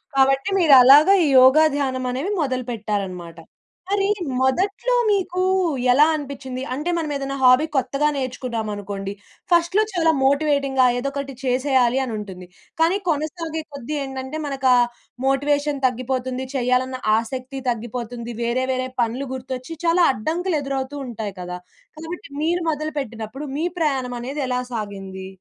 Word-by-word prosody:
కాబట్టి 270 +4 +3
మీరు 330 -6 +5
అలాగా 295 +9 +8
ఈ - - +2
యోగా, 260 +5 +7
ధ్యానం 260 -3 -1
అనేది 275 +11 -2
మొదలుపెట్టారన్నమాట. 210 - -3 0.5
మరి 395 0 +1 0.3
మొదట్లో 390 - +1 0.2
మీకు 370 -2 0 0.5
ఎలా 285 +4 +6
అనిపించింది? 270 -3 -6
అంటే 300 +6 -3
మనం 315 -3 -2
ఏదైనా 275 0 -3
హాబీ 255 +4 +6
కొత్తగా 275 +3 +1
నేర్చుకున్నామనుకోండి, 215 -6 -4 0.4
ఫస్ట్‌లో 345 +5 +3
చాలా 330 -2 +3
మోటివేటింగ్‌గా 275 -2 +2
ఏదో 275 +3 -2
ఒకటి 275 -1 -4
చేసేయాలి 255 -1 +2
అని 245 -3 -4
ఉంటుంది. 185 -3 -9 0.3
కానీ 340 +4 +4
కొనసాగే 320 +1 -2
కొద్దీ 280 +2 -5
ఏంటంటే 265 +2 -5
మనకు 275 -2 -1
ఆ - - +5 0.5
మోటివేషన్ 285 +1 0
తగ్గిపోతుంది. 255 +1 -3
చేయాలన్న 255 0 0 0.2
ఆసక్తి 255 +4 -4
తగ్గిపోతుంది. 235 0 -4
వేరే 240 +2 0
వేరే 255 0 -2
పనులు 240 +4 -1
గుర్తొచ్చి 260 +4 -6
చాలా 340 +1 +4
అడ్డంకులు 330 - -1
ఎదురవుతూ 275 0 -3
ఉంటాయి 215 -4 -5
కదా. 180 0 -5 0.4
కాబట్టి 335 +3 -7
మీరు 345 +2 0
మొదలుపెట్టినప్పుడు 275 -4 -5
మీ 320 - -1
ప్రయాణం 265 -6 0
అనేది 275 +4 -4
ఎలా 250 0 -1
సాగింది? 195 -3 -6
265 Hz, 130 wpm, -22 LUFS, 245-300 Hz, 0.5 s, అలాగా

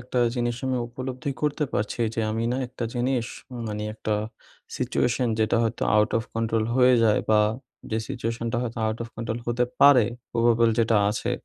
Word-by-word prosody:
একটা 125 +1 -3 0.2
জিনিস 120 -1 -1
আমি 130 - 0
উপলব্ধি 130 +4 -5
করতে 150 0 +1
পারছি 105 +3 -2
যে 115 - -1
আমি 115 +1 -1
না - - -1
একটা 120 -1 -6
জিনিস 125 -1 0 0.4
মানে 105 -1 -4
একটা 110 -1 -2 0.6
situation 125 +1 0
যেটা 110 +1 +2
হয়তো 115 +1 -2
out 105 +2 +3
of - - -3
control 115 -1 0
হয়ে 125 0 +6
যায় 105 -2 +3
বা 105 -1 +5 0.5
যে 110 - 0
situation-টা 115 0 -3
হয়তো 120 -1 -4
out 110 +1 -2
of 115 - -7
control 115 0 -3
হতে 120 +1 +1 0.2
পারে 140 -5 +8 0.3
probable 115 -1 +3
যেটা 115 -1 +3
আছে। 105 - -2
115 Hz, 175 wpm, -25 LUFS, 110-125 Hz, 0.6 s, পারে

